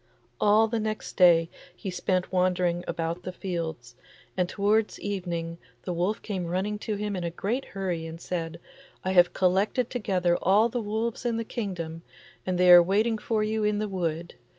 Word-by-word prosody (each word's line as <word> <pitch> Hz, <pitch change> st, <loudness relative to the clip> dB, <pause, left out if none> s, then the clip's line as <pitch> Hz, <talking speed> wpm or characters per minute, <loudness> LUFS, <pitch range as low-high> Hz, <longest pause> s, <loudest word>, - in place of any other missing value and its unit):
All 215 Hz, +2 st, +5 dB
the 225 Hz, 0 st, -1 dB
next 215 Hz, 0 st, -4 dB
day 170 Hz, -3 st, +6 dB, 0.3 s
he 190 Hz, -, -5 dB
spent 185 Hz, 0 st, -1 dB
wandering 180 Hz, -1 st, +1 dB
about 165 Hz, +1 st, -3 dB
the 185 Hz, -, -5 dB
fields, 160 Hz, -10 st, -5 dB, 0.4 s
and 180 Hz, -1 st, 0 dB
toward 210 Hz, +2 st, +1 dB
evening 170 Hz, -4 st, -4 dB, 0.2 s
the 180 Hz, -, -3 dB
wolf 180 Hz, +5 st, -1 dB
came 190 Hz, -5 st, -3 dB
running 195 Hz, +4 st, -2 dB
to 215 Hz, -1 st, -3 dB
him 205 Hz, 0 st, -3 dB
in 180 Hz, -, -3 dB
a 170 Hz, -, -1 dB
great 220 Hz, +10 st, -2 dB
hurry 180 Hz, -4 st, -3 dB
and 165 Hz, +1 st, -8 dB
said, 170 Hz, -2 st, -4 dB, 0.4 s
'I 185 Hz, -, -1 dB
have 180 Hz, -1 st, +5 dB
collected 195 Hz, +6 st, +1 dB
together 185 Hz, -7 st, 0 dB
all 205 Hz, +5 st, +4 dB
the 240 Hz, +1 st, -2 dB
wolves 220 Hz, +2 st, -2 dB
in 235 Hz, -2 st, 0 dB
the 230 Hz, -, -1 dB
kingdom, 180 Hz, -8 st, -5 dB, 0.5 s
and 185 Hz, -1 st, 0 dB
they 180 Hz, 0 st, +6 dB
are 175 Hz, 0 st, +11 dB
waiting 215 Hz, +5 st, +1 dB
for 220 Hz, -1 st, 0 dB
you 215 Hz, 0 st, -1 dB
in 210 Hz, 0 st, +1 dB
the 215 Hz, +1 st, -1 dB
wood. 170 Hz, -3 st, -3 dB
185 Hz, 180 wpm, -27 LUFS, 175-210 Hz, 0.5 s, are